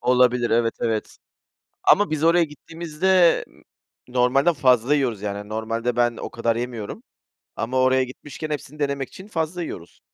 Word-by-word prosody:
Olabilir, 125 -1 +3
evet, 115 0 +2
evet. 110 -2 -2 0.7
Ama 205 +1 +5
biz 155 0 -2
oraya 170 +1 +5
gittiğimizde 165 +3 +1 0.6
normalden 130 +6 +3
fazla 130 0 +3
yiyoruz. 120 -8 -1
Yani 105 0 -5
normalde 115 +2 -2
ben 120 -1 +1
o - - -5
kadar 115 -1 -1
yemiyorum 120 -3 -5 0.5
ama 125 +3 -2
oraya 130 0 +4
gitmişken 145 +4 -8
hepsini 150 +1 -6
denemek 140 -2 -1
için 190 +2 -12
fazla 170 -1 -2
yiyoruz. 85 - -9
130 Hz, 140 wpm, -23 LUFS, 115-155 Hz, 0.7 s, Ama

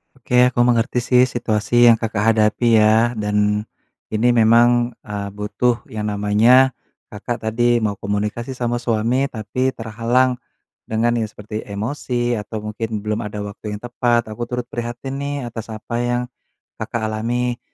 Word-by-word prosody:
Oke, 125 0 +3
aku 120 -1 +2
mengerti 120 0 +1
sih 125 0 +4
situasi 120 0 +3
yang 115 - +4
Kakak 110 -2 -2
hadapi 110 +1 +3
ya. 110 +2 +4
Dan 105 0 0 0.4
ini 115 +3 +2
memang, 120 +1 +4
eee, 100 -1 -5
butuh 115 +4 -1
yang 105 -1 -3
namanya, 110 +6 +4 0.4
Kakak 115 +2 -5
tadi 120 0 +2
mau 100 -2 -1
komunikasi 105 +5 -3
sama 120 -1 -1
suami, 120 +3 0
tapi 125 +3 -2
terhalang 120 +3 0 0.5
dengan 115 +2 +1
yang 110 - -1
seperti 105 +1 -8
emosi 120 +2 -2
atau 105 0 -6
mungkin 110 0 -4
belum 105 +1 -1
ada 105 0 -5
waktu 105 +1 -6
yang 105 - -10
tepat. 120 -1 0
Aku 120 +2 -5
turut 125 0 -3
prihatin 120 +3 -5
nih 145 0 -3 0.2
atas 115 -2 -7
apa 115 +2 -4
yang 120 0 0 0.6
Kakak 115 - -3
alami. 120 +2 -1
115 Hz, 150 wpm, -20 LUFS, 105-120 Hz, 0.6 s, sih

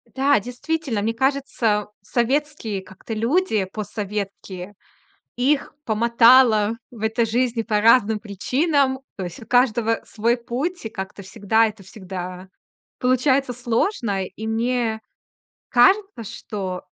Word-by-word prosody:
Да, 275 -2 +4
действительно, 250 0 -3
мне 225 +2 0
кажется, 240 -5 0
советские 240 -2 -1
как-то 190 +4 -9
люди, 230 - +1
постсоветские, 200 -1 -6 0.6
их 275 +4 +1
помотало 230 0 +5
в 225 -3 -12
этой 225 +1 +1
жизни 235 0 0
по 215 -2 0
разным 220 -2 +5
причинам. 265 - 0 0.2
То 185 - -3
есть 175 +5 -8
у - - -15
каждого 235 -2 +2
свой 235 +3 0
путь, 255 +7 -4
и - - -3
как-то 190 -1 -7
всегда 205 +4 +2
это 210 -2 -9
всегда 185 -1 -7 0.5
получается 255 +1 +2
сложно. 235 - -1
И 220 +3 -8
мне 230 -1 0 0.7
кажется, 385 - +3
что 195 -4 -5
230 Hz, 115 wpm, -22 LUFS, 210-255 Hz, 0.7 s, помотало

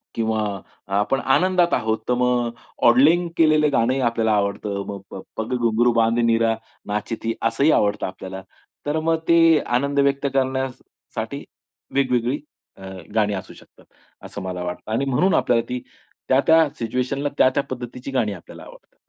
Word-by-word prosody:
किंवा 110 -1 0 0.6
आपण 135 +6 +1
आनंदात 175 +6 +2
आहोत 110 0 0
तर - - +4
मग 125 -1 +1 0.4
ऑडलिंग 155 +9 +5
केलेलं 155 -2 +4
गाणंही 130 +2 +2
आपल्याला 115 -2 +1
आवडतं, 100 0 -1
मग 100 -1 -5
प - - -8
प 95 - -6 0.2
पग 115 +3 -2
घुंगरु 120 0 +2
बांध 115 0 +2
मीरा 115 -1 +2 0.3
नाची 105 +3 -2
थी. 115 0 0
असंही 115 +7 +2
आवडतं 105 -5 +1
आपल्याला. 95 0 -8 0.4
तर 150 +2 0
मग 165 +1 +1
ते 165 -2 +6
आनंद 140 +4 0
व्यक्त 140 0 +2
करण्यासाठी 130 -1 -3 0.5
वेगवेगळी 125 -1 +1 0.4
अ, 95 - -13 0.3
गाणी 105 -2 +2
असू 95 - -6
शकतात. - - -19 0.4
असं - - -7
मला 90 -1 -4
वाटतं 90 +4 -6
आणि 125 +5 0
म्हणून 155 +9 +2
आपल्याला 115 -1 +2
ती 125 0 -2 0.5
त्या-त्या 160 +4 +4
सिच्युएशनला 130 +4 -2
त्या-त्या 130 +2 +3
पद्धतीची 125 +1 -6
गाणी 115 -6 0
आपल्याला 90 - -12
आवडतात. - - -16
125 Hz, 150 wpm, -22 LUFS, 110-140 Hz, 0.6 s, ते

